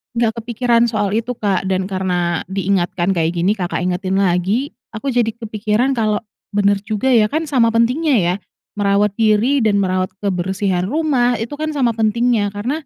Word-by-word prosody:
nggak 230 -1 +1
kepikiran 235 0 +2
soal 215 -3 0
itu, 230 +2 -1
Kak, 195 -4 -1
dan 190 0 -1
karena 180 -3 -1
diingatkan 190 -1 0
kayak 165 0 0
gini, 180 +5 +1
Kakak 180 -1 -2
ingetin 185 +2 -1
lagi, 195 - +1 0.2
aku 220 +6 -3
jadi 240 -3 +1
kepikiran 225 +3 -1
kalau 215 -1 +1 0.3
benar 200 0 +3
juga 215 +5 -1
ya, 230 -4 +5
kan 310 +8 -2
sama 230 -5 +3
pentingnya 255 +6 +2
ya, 175 +1 +1 0.4
merawat 200 0 +2
diri 225 +5 +3
dan 215 -2 +2
merawat 185 -1 0
kebersihan 190 -1 -1
rumah 260 -1 +1
itu 230 +5 -4
kan 310 0 -3
sama 250 -5 +1
pentingnya 220 -1 +1
karena, 260 +10 -3
210 Hz, 165 wpm, -18 LUFS, 190-240 Hz, 0.4 s, ya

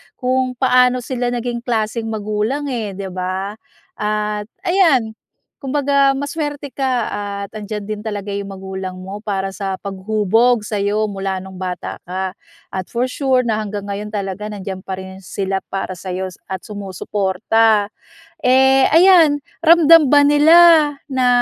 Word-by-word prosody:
kung 255 0 -1
paano 250 -1 +3
sila 245 -1 -2
naging 240 0 -3
klaseng 225 -1 -2
magulang, 215 +6 -2
eh, 215 -6 -3
di 195 0 -5
ba? 185 +2 -3 0.4
At, 210 0 -2 0.2
ayan, 315 - +3 0.4
kumbaga 280 0 +2
maswerte 290 0 -4
ka 255 -4 -1
at 200 -1 -5
andiyan 215 -1 -6
din 210 -1 -4
talaga 205 -1 -4
yung 200 0 -4
magulang 190 -1 -6
mo 195 +2 -7
para 195 -2 -2
sa 195 0 -4
paghubog 215 +4 +1
sa'yo 210 0 -1
mula 195 -1 -3
nung 190 -1 -11
bata 180 -1 -5
ka 185 +1 -4 0.3
at 185 -1 -4
for 250 +2 0
sure 260 -2 +1
na 225 -3 -1
hanggang 205 -1 -5
ngayon 210 +1 -5
talaga 200 0 -4
nandiyan 190 -2 -7
pa 190 - -4
rin 190 0 -10
sila 195 0 -3
para 190 -2 -5
sa'yo 185 0 -4 0.2
at 190 -1 -5
sumusuporta. 205 +2 0 0.5
Eh, 265 +1 +4
ayan, 325 -4 +5 0.2
ramdam 330 -3 +6
ba 290 -1 +6
nila 295 +3 +6 0.5
na 260 -3 0
215 Hz, 140 wpm, -18 LUFS, 195-255 Hz, 0.5 s, ramdam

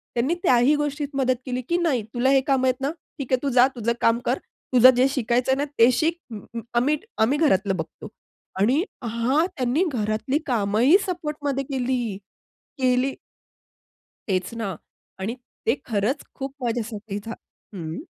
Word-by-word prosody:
त्यांनी 250 +7 +1
त्याही 255 -2 +4
गोष्टीत 295 0 -2
मदत 260 -1 +2
केली 255 -1 -2
की 345 - +2
"नाही, 305 -10 +1
तुला 245 +2 +2
हे 270 0 +5
कामं 265 -2 +3
आहेत 255 0 0
ना, 275 +2 0 0.3
ठीक 275 -3 -6
आहे, 255 - +4
तू 280 - +1
जा 250 +1 +7
तुझं 235 -1 0
काम 230 +1 +3
कर. 250 - +1 0.3
तुझं 250 0 +9
जे 255 +2 +4
शिकायचंय 250 0 +1
ना 285 +2 -1
ते 230 +2 +7
शिक. 325 +6 +1
अं, 215 - -6 0.2
अं, 230 - -3 0.2
आम्ही 290 +5 +2 0.2
आम्ही 260 +7 +3
घरातलं 200 - +2
बघतो" 160 - -7 0.5
आणि 255 - +3 0.2
हां, 235 +7 +1
त्यांनी 260 +5 +1
घरातली 220 +3 -1
कामंही 235 - +4
सपोर्टमध्ये 300 -6 -2
केली 250 -6 -2 0.6
केली. 255 +1 +2 1.2
तेच 185 0 -1
ना 195 -5 -2 0.5
आणि 210 +5 -2 0.3
ते 230 - +4
खरंच 225 +6 -1
खूप 270 0 -5
माझ्यासाठी 220 -3 -3
झा 225 - -5 0.4
हं. 165 -3 -5
250 Hz, 160 wpm, -24 LUFS, 230-275 Hz, 1.2 s, तुझं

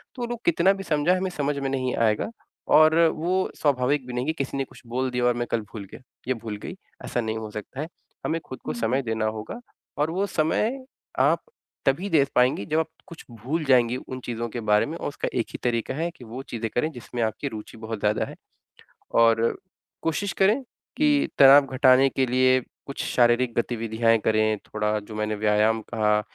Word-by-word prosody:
तो 245 -2 -3
लोग 240 -1 -4
कितना 170 +3 +4
भी 195 0 -6
समझाएँ, 160 +2 +2
हमें 190 +1 -1
समझ 145 -3 -1
में 135 - -2
नहीं 130 -1 -1
आएगा। 110 - +1 0.5
और 155 +1 +7 0.2
वो 185 +4 0
स्वाभाविक 140 -1 +1
भी 125 - -6
नहीं 125 +1 -2
कि 160 - +1
किसी 140 -2 -3
ने 135 - 0
कुछ - - -17
बोल 130 +2 -1
दिया 125 0 0
और 125 - +4
मैं 120 0 -2
कल 115 - +1
भूल 105 -3 -6
गया - - -11 0.3
या 130 - +3
भूल 110 -2 -6
गई, - - -8 0.3
ऐसा 120 - -1
नहीं 110 0 -3
हो 110 -1 -6
सकता 105 +6 -7
है। 155 - -4 0.4
हमें 165 - 0
खुद 130 - -8
को - - -2
समय 120 +3 0
देना 110 -2 -1
होगा, 110 - -4 0.4
और 150 +2 +1
वो 190 +3 0
समय 215 +11 0 0.4
आप - - +3 0.4
तभी 175 +9 +1
दे 150 -5 +4
पाएँगी 125 -4 +3
जब 155 +7 +1
आप 160 - -1 0.2
कुछ 170 -3 -12
भूल 130 +9 -3
जाएँगी 125 -2 +4
उन 130 0 -7
चीज़ों 120 -1 -3
के 120 - -5
बारे 105 - +5
में, - - -5
और - - -4
उसका - - -4
एक - - -1
ही - - -5
तरीका 120 0 0
है 165 +3 -1
कि 130 - -15
वो 120 +4 -7
चीज़ें 115 -1 -2
करें 155 +6 +1
जिसमें 120 -3 -6
आपकी 110 +6 -2
रूचि 110 -2 -8
बहुत 110 -1 -5
ज़्यादा 105 +1 +1
है। - - -10 0.9
और 115 0 +3 0.4
कोशिश 175 +4 -1
करें 210 +8 +3 0.4
कि 295 -1 +3
तनाव 140 +1 +8
घटाने 130 0 +5
के 130 - 0
लिए 130 +1 +3 0.2
कुछ 140 - -5
शारीरिक 120 0 +3
गतिविधियाँ 115 -1 +1
करें, 110 0 +2
थोड़ा 105 0 -2
जो 105 +1 -10
मैंने 105 0 -1
व्यायाम 105 +1 +2
कहा, 105 -1 +1
125 Hz, 205 wpm, -25 LUFS, 110-155 Hz, 0.9 s, तनाव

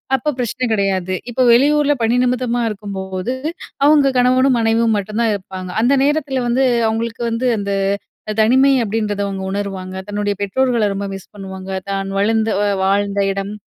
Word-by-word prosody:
அப்ப 300 +4 -1
பிரச்சனை 250 +1 -2
கெடையாது. 190 -3 0 0.2
இப்ப 250 +2 -1
வெளியூர்ல 290 +4 +4
பணி 225 +2 +2
நிமித்தமா 245 -1 0
இருக்கும்போது, 195 +1 -4 0.5
அவுங்க 295 -2 +5
கணவனும் 255 +1 +3
மனைவியும் 225 0 +2
மட்டுந்தான் 215 +3 -1
இருப்பாங்க. 185 -1 -7
அந்த 250 +4 +3
நேரத்தில 285 -3 0
வந்து 255 +3 +2 0.2
அவுங்களுக்கு 225 +1 -2
வந்து 230 +3 -2
அந்த 200 0 -3 0.7
"தனிமை" 265 +5 +4
அப்படீன்றத 210 -1 -2
அவுங்க 195 -1 -4
உணருவாங்க. 195 -2 -4
தன்னுடைய 205 -1 -2
பெற்றோர்கள 235 0 +1
ரொம்ப 200 0 -3
மிஸ் 195 - -14
பண்ணுவாங்க. 190 -1 -8 0.2
தான் 195 0 -2
வளர்ந்த 220 +1 +1 0.2
அ - - +1 0.2
வாழ்ந்த 200 +1 +1
இடம் 195 +1 -4
220 Hz, 145 wpm, -18 LUFS, 195-250 Hz, 0.7 s, அவுங்க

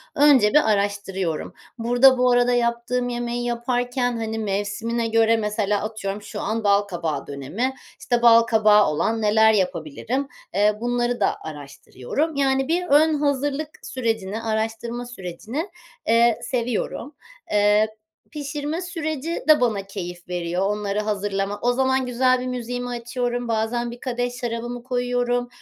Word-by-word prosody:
önce 280 -7 +6
bir 300 -6 +5
araştırıyorum. 200 -5 -2 0.2
Burada 245 +3 +5
bu 250 0 +3
arada 245 0 +3
yaptığım 240 +1 0
yemeği 240 0 -3
yaparken, 245 +1 -1
hani, 225 0 -3
mevsimine 215 +3 -2
göre, 225 0 +3
mesela, 210 -1 0
atıyorum, 210 -2 -4
şu - - -7
an 225 +1 -2
balkabağı 190 -8 0
dönemi, 145 - -3 0.3
işte, 240 -1 0
balkabağı 220 -3 +6
olan 220 +9 0
neler 220 +1 +5
yapabilirim, 190 - -1 0.3
eee, 205 +3 +3
bunları 240 0 0
da 200 - +1
araştırıyorum. 150 - -4
Yani, 270 -1 +1
bir 350 +3 0
ön 310 +2 +5
hazırlık 290 +1 0 0.2
sürecini, 225 -5 -2
araştırma 225 +2 -3
sürecini, 235 - -6 0.4
eee, 230 0 +4
seviyorum. 250 +3 -3 0.4
Eee, 210 +1 +4 0.4
pişirme 295 +2 -4
süreci 325 -3 -4
de 305 -4 +7
bana 220 -5 +1
keyif 175 -3 -7
veriyor, 175 0 -2
onları 210 -1 -1
hazırlama. 205 -1 -2
O 245 +1 +2
zaman 260 0 +1
güzel 255 +1 +2
bir 255 - -4
müziğimi 245 0 -4
açıyorum. 245 0 -3
Bazen 230 +1 -1
bir 240 - -10
kadeh 245 -1 -2
şarabımı 240 0 -4
koyuyorum. 245 -1 0
235 Hz, 130 wpm, -23 LUFS, 210-250 Hz, 0.4 s, de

